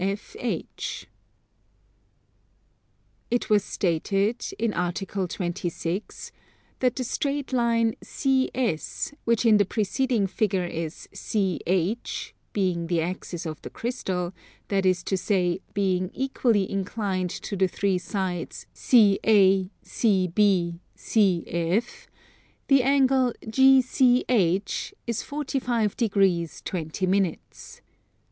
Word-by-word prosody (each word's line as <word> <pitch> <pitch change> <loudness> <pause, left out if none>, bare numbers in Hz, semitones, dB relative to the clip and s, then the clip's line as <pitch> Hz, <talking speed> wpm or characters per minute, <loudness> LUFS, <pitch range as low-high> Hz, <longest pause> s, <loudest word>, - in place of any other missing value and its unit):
It 205 - -4 2.5
was 210 -1 +5
stated, 195 +6 0
in 230 -2 0
Article 185 +2 -2
26, 175 +1 -4 0.5
that 250 -2 +1
the 255 - -2
straight 280 +2 -2
line 230 -2 +2
CS, 260 - -1
which 235 0 +2
in 220 -2 +6
the 205 - +3
preceding 220 +3 0
figure 195 -1 0
is 165 -2 -5
CH, 190 0 -1 0.2
being 180 -4 0
the 170 -1 +1
axis 175 0 -4
of 155 -1 -5
the - - -7
crystal, 190 -7 -3 0.4
that 195 -1 +2
is 180 -1 +2
to 195 - -1
say 185 -1 0
being 185 -2 +1
equally 240 -7 +1
inclined 195 -2 -2
to 200 - -5
the 190 0 +2
three 190 0 0
sides 185 -3 -4
CA, 195 -4 +4 0.2
CB, 185 -4 +2 0.2
CF, 185 +1 0 0.6
the 275 -1 +6
angle 265 -2 +3
GCH 250 - +3
is 235 -2 -2
45 250 -7 -1
degrees 195 -7 +1
20 170 +1 -3
minutes. 185 -2 -2
200 Hz, 95 wpm, -25 LUFS, 180-235 Hz, 2.5 s, in